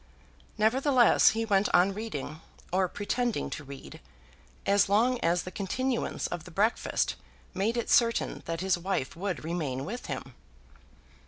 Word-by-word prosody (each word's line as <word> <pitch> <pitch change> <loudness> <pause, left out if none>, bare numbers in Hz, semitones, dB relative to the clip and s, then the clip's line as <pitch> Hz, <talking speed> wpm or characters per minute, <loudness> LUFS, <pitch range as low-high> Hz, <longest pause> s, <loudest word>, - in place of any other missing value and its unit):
Nevertheless, 245 +3 +5
he 225 - 0
went 205 -2 +2
on 180 +2 +4
reading, 160 -8 -6 0.3
or 185 0 +3
pretending 235 +5 -2
to 150 - -5
read, 140 -1 -10 0.7
as 200 0 +3
long 235 +5 +3
as 170 +1 +1
the 185 - -7
continuance 240 +6 -2
of 175 -3 -4
the - - -11
breakfast 210 +7 0 0.4
made 210 +6 0
it 235 - -1
certain 230 -1 +2
that 165 +1 -3
his 190 -2 +1
wife 175 -7 -2
would 185 0 -3
remain 150 -6 -3
with 240 +5 -6
him. 135 -2 -6
195 Hz, 145 wpm, -29 LUFS, 170-225 Hz, 0.7 s, Nevertheless